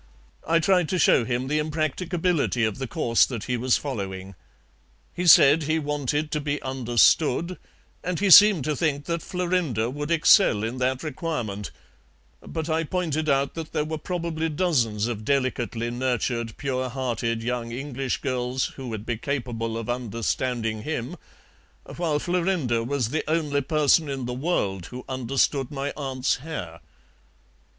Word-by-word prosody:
I 165 - +4
tried 175 0 +2
to 185 - 0
show 130 -7 +4
him 125 +1 -2
the 150 +2 +1
impracticability 155 -2 0
of 110 +3 -3
the 135 - -3
course 120 -6 +2
that 120 -5 -5
he 125 - -2
was 125 +1 +2
following. 95 -8 -5 0.8
He 180 0 -2
said 145 0 +8
he 155 +1 0
wanted 150 0 -2
to 150 - -1
be 150 0 -2
understood, 130 +6 +2 0.4
and 180 -1 -2
he 200 -1 +2
seemed 200 -4 +9
to 150 +2 -1
think 145 -3 -1
that 170 -1 -2
Florinda 170 - -1
would 145 +2 -5
excel 165 - +5
in 120 +3 -3
that 130 +2 0
requirement, 125 - -4 0.7
but 160 -1 -5
I 160 0 0
pointed 155 -2 -1
out 140 0 +1
that 165 -1 -7
there 150 - 0
were 155 0 -4
probably 165 -1 -3
dozens 130 - +1
of 115 -3 -4
delicately 120 -3 -1
nurtured, 120 -2 -2
pure 130 -2 -2
hearted 120 -3 -2
young 120 -1 -3
English 135 +1 -3
girls 130 -1 -1
who 135 -2 -6
would 110 -2 -5
be 120 -2 -2
capable 115 -3 -3
of 115 -2 -5
understanding 115 -1 -2
him, 135 +3 -4 0.8
while 165 -4 0
Florinda 170 -8 0
was 125 -2 -1
the 155 +4 -1
only 150 -3 0
person 150 +1 +2
in 135 -2 -3
the 125 - -3
world 105 - -1
who 125 0 -9
understood 130 +1 0
my 140 0 -4
aunt's 135 -2 -1
hair. 125 - -7
135 Hz, 155 wpm, -25 LUFS, 120-160 Hz, 0.8 s, seemed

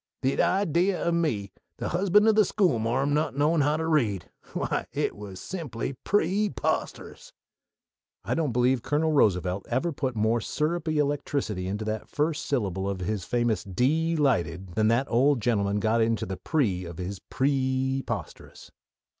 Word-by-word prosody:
The 135 +1 +2
idee 185 0 +2
o' 170 - -1
me, 135 - 0 0.3
the - - -3
husband 200 +4 +3
o' - - +7
the 215 0 +5
schoolmarm, 135 - +1
not 150 -2 0
knowin' 150 +3 +2
how 150 +2 +2
to 160 - -2
read 115 - 0 0.2
why, - - -2
it - - -1
was 100 -3 -9
simply 140 -9 -5
pree 205 +7 +1
posterous!" - - -3 0.9
I - - -1
don't 155 -5 0
believe 125 +1 +2
Colonel 155 +4 +1
Roosevelt 95 - +2
ever 130 +8 0
put 130 -4 -3
more 110 +2 +1
syrupy 155 +4 -1
electricity 140 -9 -1
into 105 +3 -3
the 110 0 -2
first 150 +1 -1
syllable 100 -7 -1
of 95 -2 -4
his 95 0 -2
famous 120 -3 0
"dee 150 - +1
lighted" 95 - 0
than 110 +2 +2
that 120 +4 +2
old 130 +3 +3
gentleman 105 -3 +1
got 110 +3 +2
into 115 0 +1
the 95 0 -5
pre 110 - 0
of 85 -2 -8
his 90 +1 -5
"preeposterous." 130 -1 -2
130 Hz, 155 wpm, -27 LUFS, 105-155 Hz, 0.9 s, o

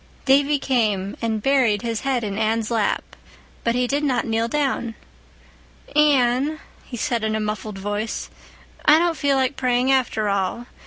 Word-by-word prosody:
Davy 280 +2 +4
came 215 -8 0
and 220 -2 -1
buried 255 -7 +2
his 230 -2 -2
head 265 -3 0
in 200 -2 -3
Anne's 220 +1 0
lap, 225 -3 +1 0.6
but 235 0 +1
he 250 0 +2
did 285 +4 -1
not 270 -4 +1
kneel 225 0 0
down. 255 -4 -1 1.0
"Anne," 285 0 +3 0.2
he 245 - -8
said 235 -3 -1
in 220 0 0
a - - -1
muffled 210 -1 -4
voice. 205 +3 -4 0.5
"I 300 - +6
don't 340 0 +1
feel 280 -1 +1
like 265 +1 0
praying 250 0 +1
after 240 -5 +1
all. 200 +4 -1
240 Hz, 160 wpm, -22 LUFS, 220-275 Hz, 1.0 s, I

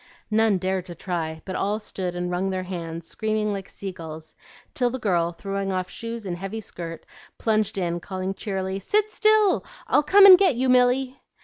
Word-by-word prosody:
None 220 -2 +3
dared 185 0 -2
to 175 - -8
try, 160 -3 -4
but 185 - -5
all 205 +2 0
stood 185 -4 -5
and 180 0 -3
wrung 185 +2 -1
their 185 -1 -2
hands, 170 -3 -6
screaming 215 +2 -1
like 195 -1 -6
sea 195 -1 -6
gulls, 160 -2 -9 0.4
till 245 -2 +1
the 255 - -4
girl, 175 -7 +1
throwing 195 +2 -4
off 185 -1 -2
shoes 230 -1 -6
and 180 -2 -3
heavy 195 +5 -5
skirt 170 -5 -7 0.3
plunged 215 -2 0
in, 175 -2 -1
calling 190 +1 -4
cheerily, 195 -2 -3
"Sit 420 - +1
still! 430 -2 +3 0.2
I'll - - +3
come 390 +7 +7
and 370 -2 +11
get 370 -9 +4
you, 255 +2 0
Milly!" 255 +1 +3
195 Hz, 190 wpm, -24 LUFS, 180-230 Hz, 0.4 s, and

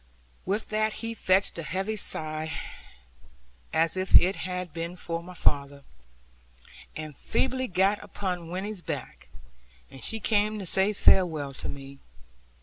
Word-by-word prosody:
With 205 +3 0
that 215 0 +1
he 230 - -2
fetched 190 -4 +2
a - - -1
heavy 190 +6 -2
sigh, 155 -5 -1 1.2
as 165 +2 +2
if 185 0 +1
it 190 +2 +8
had 180 -3 -4
been 170 +1 -4
for 165 -2 -4
my 180 +1 -11
father; 140 -3 +1 1.1
and 155 -2 -6
feebly 260 - 0
got 195 +2 +2
upon 180 -4 -4
Winnie's 190 +2 -4
back, 65 - -6 0.6
and 135 -3 -10
she 225 - -1
came 215 0 +2
to 200 - -5
say 190 +3 +3
farewell 160 -8 +4
to - - -6
me. 140 0 -8
180 Hz, 140 wpm, -28 LUFS, 160-205 Hz, 1.2 s, it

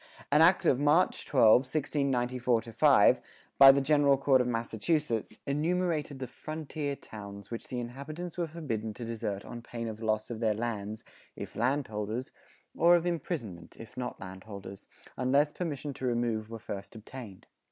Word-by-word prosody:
An 150 +2 +5
act 175 +3 +5
of 130 - +4
March 150 +5 +2
12, 115 -6 +6
1694 130 -4 0
5, 115 -1 +4 0.4
by 135 0 +11
the 140 +1 +2
General 140 -1 +4
Court 135 -1 +4
of 125 - -1
Massachusetts 115 0 -1
enumerated 155 0 -1
the 130 - -4
"Frontier 150 +2 -5
Towns" 100 -4 -10
which 115 - -6
the 125 - -4
inhabitants 150 +8 -6
were 175 -2 -1
forbidden 115 -10 -4
to 120 - -6
desert 105 -3 -4
on 120 - -8
pain 115 -1 -6
of 110 0 -6
loss 110 0 -1
of 115 - -5
their 110 -2 +1
lands 110 -2 -4 0.3
(if - - -8
landholders) 120 -2 -2 0.4
or 170 +1 +6
of 175 0 +1
imprisonment 140 - -4
(if 115 -1 -11
not 125 -1 -5
landholders), 95 +1 -9 0.3
unless 140 +4 +2
permission 150 -5 -4
to 130 - -6
remove 115 -3 -1
were 115 - -6
first 100 0 -8
obtained. 110 -3 -10
125 Hz, 155 wpm, -30 LUFS, 110-145 Hz, 0.4 s, by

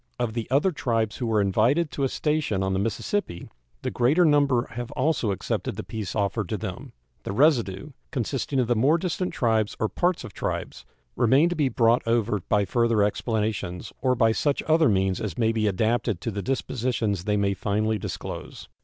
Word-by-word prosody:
Of 120 -2 -2
the 115 -1 -4
other 145 +9 +3
tribes 115 -8 -1
who 120 - -2
were 110 -2 +2
invited 120 - +2
to 140 - -3
a 135 - +2
station 150 -12 0
on 95 0 0
the 95 - 0
Mississippi 115 - -2 0.4
the - - -2
greater 145 +9 +3
number 140 -5 +3
have 120 +1 -5
also 150 -9 0
accepted 95 - -2
the - - -5
peace 110 -4 -5
offered 100 -2 -1
to - - -1
them. - - -7 0.3
The - - -5
residue, 130 -1 +2 0.2
consisting 135 +2 -2
of 125 - +3
the 120 +1 +1
more 135 +9 +4
distant 180 +1 -2
tribes 110 -3 0
or 110 - 0
parts 180 -1 0
of 100 - -9
tribes, - - -4 0.3
remain 135 +8 +4
to 175 - -2
be 145 -5 +1
brought 115 0 +3
over 115 -2 +1
by 105 -1 +3
further 115 +1 +2
explanations, 105 -4 -2
or 130 -1 +2
by 115 -2 +3
such 140 +5 0
other 160 -3 +4
means 95 -2 +1
as 105 -7 -4
may 115 -2 +2
be 110 -1 0
adapted 110 0 0
to 115 - -3
the 100 0 -4
dispositions 115 -5 -1
they 105 0 +1
may 100 -1 +1
finally 105 +3 -1
disclose. - - -7
115 Hz, 190 wpm, -25 LUFS, 105-135 Hz, 0.4 s, more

